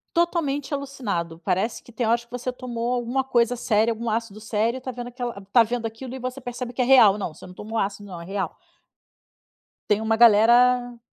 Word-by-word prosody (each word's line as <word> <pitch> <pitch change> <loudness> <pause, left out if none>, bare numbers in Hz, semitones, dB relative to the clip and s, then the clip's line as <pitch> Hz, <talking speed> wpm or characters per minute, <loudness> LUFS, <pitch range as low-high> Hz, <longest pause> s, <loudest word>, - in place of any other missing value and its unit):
Totalmente 310 -5 0
alucinado. 210 -13 -3
Parece 190 +5 -1
que - - -16
tem 235 0 -2
horas 235 +1 +1
que 235 - -33
você 250 +1 -4
tomou 245 -1 -3
alguma 245 +2 -1
coisa 245 -2 +2
séria, 225 -1 +2
algum 230 +1 -3
ácido 220 -1 -3
sério, 225 +3 -1
e - - -12
tá 255 0 -5
vendo 245 0 -6
aquela 245 -2 -5
está 215 +4 +4
vendo 235 0 -3
aquilo, 240 +3 -7
e 260 - -7
você 255 +2 -5
percebe 245 0 -6
que 255 - -6
é - - +4
real: 225 -6 +6
"Não, 170 -6 -4
você - - -14
não 180 - -10
tomou 220 +4 -7
ácido 205 0 -2
não, 175 -2 -7
é - - -9
real". 195 -2 -4 1.3
Tem 210 +1 +3
uma 220 0 +1
galera 240 +2 +5
235 Hz, 210 wpm, -24 LUFS, 215-250 Hz, 1.3 s, real